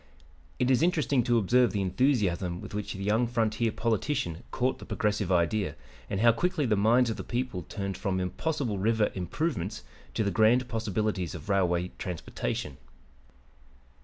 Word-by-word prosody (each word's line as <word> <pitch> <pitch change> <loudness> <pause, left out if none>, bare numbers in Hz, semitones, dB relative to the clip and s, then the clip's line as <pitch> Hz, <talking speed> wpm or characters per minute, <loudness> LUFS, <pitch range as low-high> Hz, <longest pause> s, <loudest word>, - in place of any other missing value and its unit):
It 125 +1 +2
is 130 - +3
interesting 155 -6 +2
to 120 -1 +3
observe 120 +1 +3
the 100 - 0
enthusiasm 95 -5 +1
with - - -9
which 105 0 -3
the 95 - -6
young 110 +4 +2
frontier 115 -1 0
politician 110 - -1
caught 130 +1 0
the - - -9
progressive 105 -3 0
idea, 90 -1 +1 0.3
and 95 - -1
how 115 0 +7
quickly 165 +5 0
the 110 -4 +2
minds 115 +4 +4
of - - -4
the - - -5
people 120 -8 -3
turned 100 -1 -3
from 95 -1 -1
impossible 115 - -2
river 110 +1 +2
"improvements" 100 - -3 0.3
to 110 - +1
the 100 - 0
grand 115 +4 +4
possibilities 110 -5 -2
of 80 +1 -9
railway 90 -2 +1
transportation. 80 -5 -4
110 Hz, 160 wpm, -28 LUFS, 95-120 Hz, 0.3 s, how